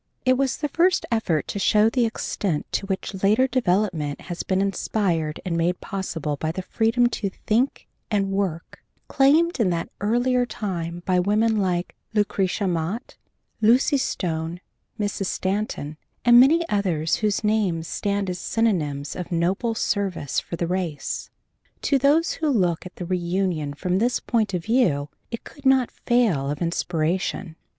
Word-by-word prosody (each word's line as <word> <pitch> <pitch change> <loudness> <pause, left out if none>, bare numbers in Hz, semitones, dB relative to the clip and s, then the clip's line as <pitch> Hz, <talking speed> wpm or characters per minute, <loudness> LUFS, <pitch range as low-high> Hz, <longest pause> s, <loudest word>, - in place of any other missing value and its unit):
It 255 0 +5
was 270 0 0
the 295 - -1
first 355 +5 +2
effort 180 -9 0
to 200 - -3
show 210 +2 +4
the 235 +1 +2
extent 195 -7 -2
to 195 - -2
which 190 0 -4
later 215 +6 +4
development 185 - 0
has 175 -2 -5
been 190 0 0
inspired 185 -5 0
and 175 -2 -1
made 170 +2 +1
possible 165 -7 -3
by 155 +2 -2
the 185 +3 -5
freedom 230 +5 +2 0.2
to 200 - 0
think 230 +7 -1 0.2
and 195 -2 0
work 190 -4 -3 0.2
claimed 305 +4 +3
in 215 -5 +3
that 170 -1 -2
earlier 245 +4 +2
time 175 -7 -4
by 180 -1 +2
women 215 +4 +2
like 180 -3 0 0.2
Lucretia 200 -1 +1
Mott, 180 +7 -3 0.5
Lucy 245 +6 +4
Stone, 165 -6 -2 0.4
Mrs. 205 -2 -1
Stanton, 185 -7 -2 0.3
and 240 0 +8
many 325 +6 +5
others 175 -6 0
whose 215 0 0
names 200 -7 +1
stand 200 +2 -1
as 180 -1 -3
synonyms 155 -12 -1
of 180 -1 -6
noble 185 +7 0
service 190 -11 -1
for - - -6
the 170 - -2
race. 170 -5 -3 0.5
To 275 - +3
those 295 +5 +3
who 315 -2 -1
looked 180 - +1
at 180 - -15
the 180 - -6
reunion 175 -4 -1
from 180 +4 0
this 245 +3 +1
point 215 -5 0
of 175 - -2
view 180 - +2 0.2
it 230 - -6
could 285 - -14
not 265 -2 +4
fail 215 - +1
of 145 0 -3
inspiration. 170 0 -1
195 Hz, 155 wpm, -24 LUFS, 170-230 Hz, 0.5 s, and